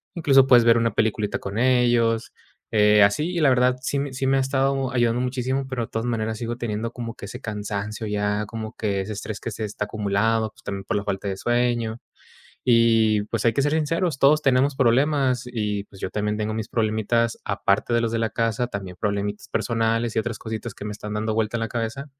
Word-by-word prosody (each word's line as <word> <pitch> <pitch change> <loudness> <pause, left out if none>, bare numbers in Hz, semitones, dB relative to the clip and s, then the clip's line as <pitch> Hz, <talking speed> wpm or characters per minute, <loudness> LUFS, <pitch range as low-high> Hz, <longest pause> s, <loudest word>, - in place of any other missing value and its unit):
incluso, 135 -6 +5
puedes 120 -3 +6
ver 115 0 +6
una 115 0 +1
peliculita 110 -1 0
con 100 +1 -6
ellos, 120 -2 +2 0.4
eh 105 -1 +5
así. 150 - +2
Y 175 - -2
la 150 - +5
verdad, 125 0 +3
sí 140 +1 -1
mi 140 -1 -3
sí, 130 +1 -2
me 135 - +3
ha - - +2
estado 135 0 0
ayudando 120 -1 +1
muchísimo, 130 +1 -1
pero 130 -3 -3
de - - -20
todas 115 +1 -2
maneras 110 -2 -2
sigo 120 0 -4
teniendo 115 -1 -3
como 115 -2 -5
que - - -9
ese - - -8
cansancio, 105 0 -4
ya 105 0 -1
como 110 0 -6
que 100 -3 -1
ese 105 +3 -5
estrés 105 0 -6
que 115 - -5
se 110 +1 -5
está 105 0 -4
acumulado, 110 +2 0
pues - - -22
también 100 -1 -5
por - - -1
la 100 - -3
falta 100 0 -3
de 95 - -3
sueño. 120 0 0 0.7
Y 115 -3 +4
pues 110 0 -3
hay 115 - +4
que 140 - +1
ser 145 +2 +1
sinceros, 160 0 0
todos 150 +3 +5
tenemos 135 0 +2
problemas, 135 0 +2
y 105 -4 -2
pues, 95 - -16
yo - - -2
también 105 0 -1
tengo 110 0 -2
mis 110 0 -3
problemitas, 115 +1 0
aparte 100 +3 0
de 115 - +3
los 115 -1 -1
de 115 - -1
la 115 0 0
casa, 115 +2 0
también 95 -5 -7
problemitas 100 0 -2
personales 115 0 0
y - - +3
otras 110 -1 -4
cositas 110 -1 -5
que - - -9
me 105 - -4
están 105 0 -6
dando 110 +1 -1
vuelta 110 +1 0
en 115 - -4
la 115 - -1
cabeza. 120 +5 -3
115 Hz, 220 wpm, -24 LUFS, 105-125 Hz, 0.7 s, puedes